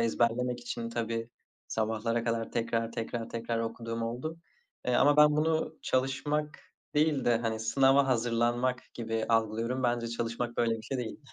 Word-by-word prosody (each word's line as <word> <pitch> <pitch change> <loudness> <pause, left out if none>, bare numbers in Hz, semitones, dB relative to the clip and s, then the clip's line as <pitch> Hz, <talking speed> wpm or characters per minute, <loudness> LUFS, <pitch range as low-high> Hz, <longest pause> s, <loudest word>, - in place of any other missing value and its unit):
ezberlemek 120 +2 +1
için 120 -1 -4
tabii, 115 0 -3 0.4
sabahlara 115 +1 -1
kadar 115 -1 -1
tekrar 115 0 -1
tekrar 115 0 -4
tekrar 115 0 -2
okuduğum 115 0 -3
oldu. 125 +8 -3 0.5
Eee, - - +2
ama 145 0 +5
ben 150 0 +7
bunu 160 0 0
çalışmak 145 +4 0 0.4
değil 150 -2 +2
de, 120 -1 +4
hani, 110 -1 -2
sınava 135 +4 +4
hazırlanmak 120 +1 +1
gibi 115 -1 -2
algılıyorum. 115 +3 +1
Bence 120 -1 +1
çalışmak 115 +1 -3
böyle 115 -1 +2
bir 110 - -10
şey 130 +3 -3
değil. 120 -3 -4
115 Hz, 150 wpm, -30 LUFS, 115-130 Hz, 0.5 s, ben